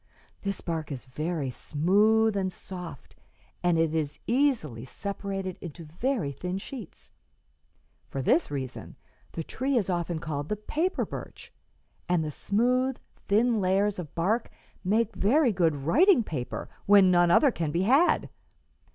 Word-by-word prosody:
This 200 Hz, -1 st, -3 dB
bark 160 Hz, -3 st, -3 dB
is 135 Hz, -2 st, -6 dB
very 150 Hz, +1 st, -3 dB
smooth 210 Hz, -, +2 dB
and 190 Hz, -1 st, 0 dB
soft, 180 Hz, -6 st, -9 dB, 0.5 s
and 175 Hz, -2 st, +2 dB
it 165 Hz, -1 st, +2 dB
is 150 Hz, -3 st, -1 dB
easily 235 Hz, -, +1 dB
separated 195 Hz, +4 st, -5 dB
into 170 Hz, -1 st, -8 dB
very 180 Hz, -, -1 dB
thin 180 Hz, +7 st, -4 dB
sheets. 225 Hz, -, -9 dB, 1.0 s
For 135 Hz, -, -3 dB
this 170 Hz, -, +3 dB
reason 135 Hz, -3 st, -6 dB, 0.4 s
the 165 Hz, -, -3 dB
tree 260 Hz, -, -1 dB
is 195 Hz, -5 st, +1 dB
often 175 Hz, -1 st, -1 dB
called 150 Hz, -2 st, -4 dB
the 210 Hz, -, 0 dB
paper 315 Hz, -, -1 dB
birch, -, -, -9 dB, 0.6 s
and 175 Hz, -2 st, +2 dB
the 155 Hz, -, -3 dB
smooth, 250 Hz, -, +1 dB, 0.3 s
thin 225 Hz, +2 st, +3 dB
layers 195 Hz, +2 st, +1 dB
of 160 Hz, -5 st, -7 dB
bark 210 Hz, +8 st, 0 dB, 0.3 s
make 215 Hz, +4 st, +1 dB
very 250 Hz, +5 st, +3 dB
good 170 Hz, -5 st, +2 dB
writing 245 Hz, -, +4 dB
paper 135 Hz, -, -5 dB, 0.2 s
when 200 Hz, -2 st, +7 dB
none 175 Hz, -1 st, +4 dB
other 275 Hz, -, +5 dB
can 165 Hz, -8 st, -2 dB
be 170 Hz, +4 st, 0 dB
had." 275 Hz, -, +4 dB
185 Hz, 145 wpm, -28 LUFS, 160-220 Hz, 1.0 s, when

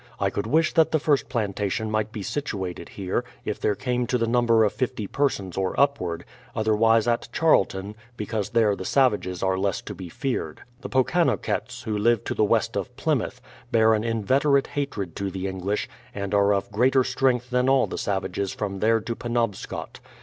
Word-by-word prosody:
I 100 Hz, -1 st, +1 dB
could 100 Hz, +2 st, -3 dB
wish 160 Hz, +6 st, +2 dB
that 160 Hz, -1 st, +4 dB
the 160 Hz, -, +2 dB
first 145 Hz, -3 st, +1 dB
plantation 105 Hz, -2 st, -1 dB
might 110 Hz, 0 st, 0 dB
be 105 Hz, -3 st, -5 dB
situated 95 Hz, -, -4 dB
here, 95 Hz, +4 st, -2 dB, 0.2 s
if 105 Hz, -, -3 dB
there 105 Hz, -, +1 dB
came 125 Hz, 0 st, -1 dB
to 125 Hz, -, +1 dB
the 115 Hz, -, +1 dB
number 115 Hz, -1 st, +3 dB
of 105 Hz, -, +1 dB
fifty 125 Hz, -4 st, -2 dB
persons 100 Hz, -8 st, -1 dB
or 95 Hz, -1 st, -1 dB
upward; 90 Hz, -13 st, +1 dB, 0.3 s
other 110 Hz, -1 st, +2 dB
wise 115 Hz, +1 st, +4 dB
at 120 Hz, 0 st, +1 dB
Charlton, 100 Hz, -10 st, +2 dB, 0.2 s
because 105 Hz, -1 st, -3 dB
there 110 Hz, -3 st, +3 dB
the 95 Hz, -, -6 dB
savages 100 Hz, -7 st, +1 dB
are 95 Hz, 0 st, +1 dB
less 100 Hz, -1 st, 0 dB
to -, -, -7 dB
be 90 Hz, -2 st, -8 dB
feared. 120 Hz, -, -3 dB, 0.2 s
The -, -, -7 dB
Pokanokcts, 130 Hz, -4 st, 0 dB
who 110 Hz, -3 st, -2 dB
live 115 Hz, +2 st, +2 dB
to -, -, -2 dB
the -, -, +1 dB
west 105 Hz, -, +1 dB
of -, -, -4 dB
Plymouth, -, -, -1 dB, 0.3 s
bear 110 Hz, -1 st, +5 dB
an 110 Hz, 0 st, +1 dB
in 115 Hz, -2 st, -1 dB
veterate 140 Hz, +3 st, +3 dB
hatred 105 Hz, -, -3 dB
to 100 Hz, 0 st, -2 dB
the 95 Hz, 0 st, -5 dB
English, 95 Hz, +2 st, -2 dB, 0.3 s
and 100 Hz, 0 st, -3 dB
are 100 Hz, 0 st, +4 dB
of 100 Hz, 0 st, 0 dB
greater 130 Hz, +5 st, +3 dB
strength 125 Hz, -1 st, 0 dB
than 125 Hz, +1 st, +2 dB
all 135 Hz, -1 st, +4 dB
the -, -, -5 dB
savages 100 Hz, 0 st, -2 dB
from 100 Hz, -2 st, -3 dB
there 115 Hz, +2 st, +3 dB
to 115 Hz, +2 st, -4 dB
Penobscot. 120 Hz, -4 st, -3 dB
110 Hz, 195 wpm, -25 LUFS, 100-125 Hz, 0.3 s, bear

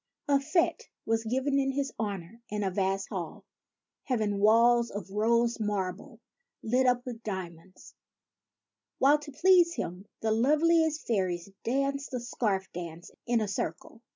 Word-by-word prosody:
A 280 Hz, -1 st, +4 dB
fete 310 Hz, +5 st, 0 dB, 0.2 s
was 225 Hz, 0 st, 0 dB
given 265 Hz, +4 st, +1 dB
in 270 Hz, 0 st, 0 dB
his 275 Hz, 0 st, -2 dB
honor 205 Hz, 0 st, -4 dB
in 210 Hz, 0 st, -2 dB
a 190 Hz, -, 0 dB
vast 195 Hz, +1 st, -1 dB
hall, 175 Hz, -6 st, -6 dB, 0.6 s
having 215 Hz, -6 st, 0 dB
walls 235 Hz, +3 st, +5 dB
of 200 Hz, -1 st, -7 dB
rose 235 Hz, +3 st, +2 dB
marble, 200 Hz, -3 st, -3 dB, 0.4 s
lit 250 Hz, +3 st, +2 dB
up 245 Hz, 0 st, +2 dB
with 240 Hz, -3 st, -6 dB
diamonds; 185 Hz, -3 st, -7 dB, 1.0 s
while, 285 Hz, +3 st, +5 dB
to 295 Hz, 0 st, -10 dB
please 345 Hz, +3 st, +4 dB
him, 180 Hz, +4 st, -5 dB
the 220 Hz, -, 0 dB
loveliest 315 Hz, +6 st, +3 dB
fairies 185 Hz, -4 st, -1 dB
danced 275 Hz, +2 st, -1 dB
a -, -, -1 dB
scarf 210 Hz, -5 st, -1 dB
dance 170 Hz, -1 st, -7 dB, 0.2 s
in 235 Hz, -1 st, +2 dB
a 215 Hz, -, -1 dB
circle. 195 Hz, +2 st, -4 dB
225 Hz, 145 wpm, -29 LUFS, 195-270 Hz, 1.0 s, walls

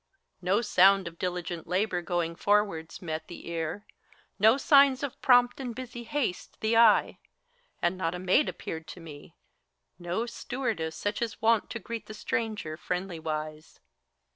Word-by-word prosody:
No 190 Hz, +5 st, +2 dB
sound 195 Hz, -3 st, +5 dB
of 170 Hz, 0 st, -9 dB
diligent 175 Hz, -2 st, -4 dB
labor, 185 Hz, +1 st, 0 dB
going 170 Hz, -1 st, -2 dB
forwards, 195 Hz, -4 st, 0 dB
met 160 Hz, -2 st, -4 dB
The 175 Hz, -, -10 dB
ear, 165 Hz, +5 st, -4 dB, 0.5 s
no 220 Hz, +4 st, +6 dB
sig^s 280 Hz, -1 st, +5 dB
of 280 Hz, -, -5 dB
prompt 245 Hz, 0 st, +4 dB
and 245 Hz, -4 st, -5 dB
busy 245 Hz, -2 st, -7 dB
haste 260 Hz, -8 st, -3 dB
the 220 Hz, +1 st, +1 dB
eye; 225 Hz, -2 st, +5 dB, 0.6 s
And 175 Hz, +2 st, +1 dB
not 165 Hz, -1 st, -1 dB
a -, -, -4 dB
maid 185 Hz, +11 st, +2 dB
appeared 160 Hz, 0 st, -7 dB
to 175 Hz, -, -9 dB
me, 150 Hz, -4 st, -12 dB, 0.6 s
no 175 Hz, +6 st, -2 dB
stewardess 230 Hz, -9 st, -3 dB
Such 205 Hz, +6 st, -3 dB
as 230 Hz, -2 st, -1 dB
is -, -, -20 dB
wont 225 Hz, -1 st, +3 dB
to -, -, -4 dB
greet 230 Hz, 0 st, -7 dB
the 215 Hz, -, -8 dB
stranger, 210 Hz, -9 st, -3 dB
friendly 180 Hz, 0 st, -4 dB
wise. 155 Hz, 0 st, -5 dB
190 Hz, 160 wpm, -28 LUFS, 170-230 Hz, 0.6 s, no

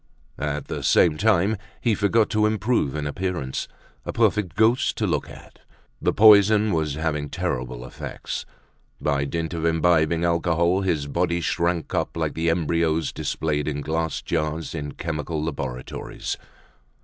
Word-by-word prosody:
At 75 Hz, 0 st, -2 dB
the -, -, -4 dB
same 80 Hz, -3 st, +4 dB
time, 105 Hz, +2 st, +2 dB, 0.2 s
he 115 Hz, -, +1 dB
forgot 105 Hz, +2 st, +2 dB
to 105 Hz, -1 st, +3 dB
improve 110 Hz, -, 0 dB
in 75 Hz, -1 st, -2 dB
appearance; 75 Hz, -4 st, -3 dB, 0.4 s
a -, -, -4 dB
perfect 100 Hz, -5 st, +1 dB
ghost 110 Hz, +4 st, +3 dB
to -, -, 0 dB
look -, -, -1 dB
at! -, -, -14 dB, 0.4 s
The -, -, +2 dB
poison 105 Hz, 0 st, +6 dB
was 80 Hz, -3 st, 0 dB
having 75 Hz, -2 st, -2 dB
terrible 60 Hz, -1 st, -3 dB
effects. 65 Hz, -, -6 dB, 0.5 s
By 70 Hz, -2 st, 0 dB
dint 80 Hz, +3 st, -3 dB
of 80 Hz, -1 st, -3 dB
imbibing 80 Hz, 0 st, +2 dB
alcohol, 85 Hz, +2 st, +2 dB
his 80 Hz, -7 st, 0 dB
body 85 Hz, +4 st, 0 dB
shrunk 85 Hz, -1 st, -1 dB
up -, -, -1 dB
like -, -, -1 dB
the 80 Hz, +1 st, 0 dB
embryos 80 Hz, -1 st, +1 dB
displayed 75 Hz, -2 st, -2 dB
in 75 Hz, -1 st, -2 dB
glass 80 Hz, +1 st, -2 dB
jars 80 Hz, 0 st, -2 dB
in 75 Hz, -3 st, -5 dB
chemical 80 Hz, -1 st, -3 dB
laboratories. 65 Hz, -5 st, -4 dB
80 Hz, 145 wpm, -24 LUFS, 75-90 Hz, 0.5 s, poison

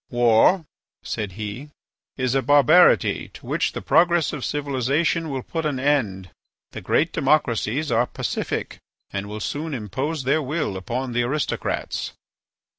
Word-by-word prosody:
"War," 120 Hz, -, +4 dB, 0.4 s
said 105 Hz, -4 st, -4 dB
he, 110 Hz, +8 st, -6 dB, 0.5 s
"is 130 Hz, -2 st, 0 dB
a 135 Hz, -, +2 dB
barbarity 145 Hz, +6 st, +5 dB
to -, -, -12 dB
which -, -, -1 dB
the -, -, -6 dB
progress 175 Hz, -1 st, +3 dB
of 145 Hz, -4 st, -5 dB
civilization 145 Hz, +3 st, 0 dB
will 135 Hz, -3 st, -3 dB
put 165 Hz, -1 st, -4 dB
an 145 Hz, -4 st, -1 dB
end. 110 Hz, -, 0 dB, 0.4 s
The -, -, -7 dB
great -, -, +1 dB
democracies 135 Hz, -1 st, +1 dB
are 120 Hz, +1 st, +2 dB
pacific -, -, -4 dB, 0.3 s
and 100 Hz, +1 st, -4 dB
will 105 Hz, +1 st, -5 dB
soon 150 Hz, +7 st, -3 dB
impose 130 Hz, -, -3 dB
their 140 Hz, +5 st, +2 dB
will 150 Hz, -, -2 dB
upon 120 Hz, +7 st, -3 dB
the 120 Hz, +1 st, +1 dB
aristocrats." 140 Hz, +5 st, -2 dB
135 Hz, 140 wpm, -23 LUFS, 115-150 Hz, 0.5 s, barbarity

